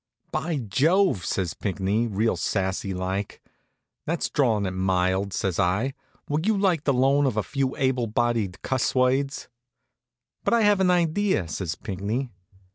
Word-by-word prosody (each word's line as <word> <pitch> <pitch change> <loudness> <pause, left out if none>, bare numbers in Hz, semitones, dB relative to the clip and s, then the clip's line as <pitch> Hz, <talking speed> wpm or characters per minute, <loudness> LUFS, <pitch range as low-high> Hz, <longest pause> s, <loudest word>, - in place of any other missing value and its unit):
"By 160 -1 -1
Jove!" 140 - +2
says 90 -5 -1
Pinckney, 100 +3 -1
real 110 +2 0
sassy 95 0 -1
like. 95 +2 -3 0.7
"That's 170 +1 -1
drawin' 115 -8 +2
it 95 - -1
mild," 95 +1 0
says 95 -2 -2
I. 100 +9 +1 0.3
"Would 155 +6 -1
you 220 -2 +3
like 185 -6 +1
the 140 - +3
loan 135 +2 +3
of 115 -5 -2
a 105 - +1
few 135 +5 -2
able 130 -3 +1
bodied 110 -4 -1
cuss 130 -1 0
words?" 130 +2 +1 1.0
"But - - +3
I 230 - +3
have 205 -2 +4
an 190 -1 +3
idea," 175 - +1
says 80 +1 -3
Pinckney. 105 +7 -3
120 Hz, 150 wpm, -25 LUFS, 95-145 Hz, 1.0 s, have